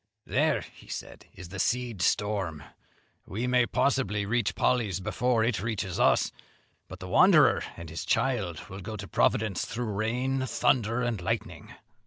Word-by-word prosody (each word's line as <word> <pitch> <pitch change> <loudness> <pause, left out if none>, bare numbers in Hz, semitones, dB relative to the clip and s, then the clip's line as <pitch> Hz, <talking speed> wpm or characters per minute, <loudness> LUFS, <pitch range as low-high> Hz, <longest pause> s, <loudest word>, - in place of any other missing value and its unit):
"There," - - +1 0.2
said - - -8
he, - - -13
"is 90 - -9
the 95 +1 -7
seed 120 -3 -1
storm; 95 -8 0 0.6
we 110 +6 -3
may 125 -1 +3
possibly 105 -7 +1
reach 110 0 0
Polley's 110 -7 +1
before 110 +4 +1
it 115 -5 0
reaches 100 -4 -3
us, - - +3 0.6
but - - -10
the - - -7
wanderer - - +5 0.2
and 85 0 -8
his 80 +2 -5
child 105 - -1
will 95 +1 -8
go 105 +3 -6
to 100 0 -7
Providence 105 -2 +1
through 120 +1 -4
rain, 125 +6 -1
thunder, 120 -1 +1
and 120 -6 -1
lightning." 105 +2 -4
110 Hz, 155 wpm, -28 LUFS, 95-120 Hz, 0.6 s, wanderer